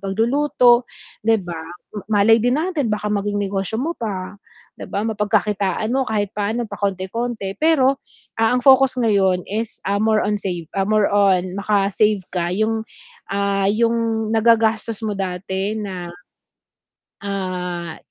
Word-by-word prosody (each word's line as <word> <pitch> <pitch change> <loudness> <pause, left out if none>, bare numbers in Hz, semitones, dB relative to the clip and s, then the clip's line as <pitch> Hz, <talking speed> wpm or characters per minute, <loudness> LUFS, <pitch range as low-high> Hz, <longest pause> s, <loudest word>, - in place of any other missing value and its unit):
pagluluto, 240 +4 +3 0.4
'di 225 -1 +4
ba? 175 -2 -6 0.5
Malay 210 +2 +5
din 245 +6 +1
natin 335 -7 -1
baka 210 0 -2
maging 205 0 -1
negosyo 195 +2 -2
mo 330 +5 -2
pa, 200 -4 -5 0.4
'di - - -8
ba? 200 - 0
Mapagkakitaan 210 -1 0
mo 265 0 +1
kahit 205 -2 -1
paano, 215 +3 -1
pakonti-konti. 200 +2 -3
Pero, 280 -4 +3 0.4
ah, 225 +1 +3
ang - - +1
focus 265 -1 +5
ngayon 195 -5 +2
is, 220 +2 -4
ah, 200 - +1
more 215 0 +3
on 210 0 0
save 175 -5 -4
ah, 195 - +2
more 215 -1 +3
on 190 -2 +2
maka-save 205 +1 +2
ka 175 -2 -1
yung, 220 +3 0 0.5
ah, 200 0 0
yung 230 0 0
nagagastos 225 -1 +2
mo 215 - -1
dati 190 +1 -3
na, 185 -4 -5 1.1
ah, 180 -4 -4
210 Hz, 135 wpm, -20 LUFS, 195-225 Hz, 1.1 s, Malay